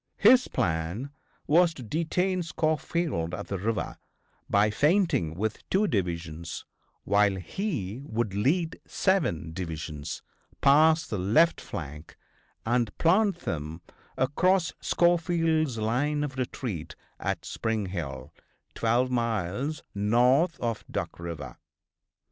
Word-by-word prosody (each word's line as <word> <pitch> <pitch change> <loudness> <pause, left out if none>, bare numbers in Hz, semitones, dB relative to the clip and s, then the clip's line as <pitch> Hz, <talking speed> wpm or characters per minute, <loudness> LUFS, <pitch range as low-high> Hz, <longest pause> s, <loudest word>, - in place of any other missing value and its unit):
His 250 +4 +6
plan 85 +11 -1 0.3
was 165 +2 +4
to 130 - -8
detain 180 - 0
Schofield 155 - -1
at - - -7
the 100 - -2
river 110 +3 -2 0.5
by 105 +1 +4
feinting 145 - +2
with 105 +4 -2
two 200 +3 +3
divisions 85 - -3 0.4
while 100 -1 +3
he 110 - -3
would 110 -3 -1
lead 160 - +1
seven 120 - 0
divisions 80 -3 -5 0.4
past 155 +3 +5
the 105 - -1
left 135 - +3
flank 75 0 -7 0.5
and 120 -2 0
plant 195 +4 +3
them 80 +1 -4 0.3
across 175 +6 +2
Schofield's 165 -5 +2
line 135 +7 0
of 140 -2 -4
retreat 120 - -4 0.2
at - - -2
Spring 110 -2 -2
Hill, 75 -9 -5 0.4
twelve 120 +3 +1
miles 115 - -1
north 125 - +3
of 115 -2 -2
Duck - - -4
River. 85 -5 -6
120 Hz, 110 wpm, -28 LUFS, -, 0.5 s, His